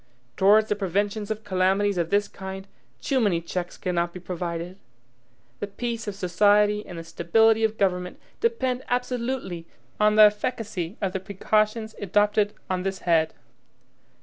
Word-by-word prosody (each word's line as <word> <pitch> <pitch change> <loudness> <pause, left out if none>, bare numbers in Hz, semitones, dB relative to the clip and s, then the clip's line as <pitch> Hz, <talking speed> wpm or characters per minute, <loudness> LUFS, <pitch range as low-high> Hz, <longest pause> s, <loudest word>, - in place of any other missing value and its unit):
Towards 210 +3 +5
the 210 - +1
preventions 205 +2 -1
of 215 0 -4
calamities 190 0 +1
of 165 -1 -1
this 205 +2 +2
kind, 190 0 -8 0.4
too 270 -2 +1
many 200 -8 +2
checks 175 +1 -5
cannot 175 -1 -1
be 180 - -7
provided. 175 0 -5 0.8
The 205 - -3
peace 230 +2 -4
of 205 - -3
society 205 +3 +3
and 175 - -8
the 165 - -6
stability 220 +7 +3
of 220 0 +1
government 180 -2 -1 0.2
depend 260 - 0
absolutely 245 -8 -2 0.3
on 210 0 +4
the 215 - +9
efficacy 210 -3 0
of 190 -2 0
the 190 - -1
precautions 215 +3 0
adopted 205 +1 +2
on 185 -1 -1
this 190 0 -3
head. 165 -2 +2
205 Hz, 150 wpm, -25 LUFS, 180-215 Hz, 0.8 s, the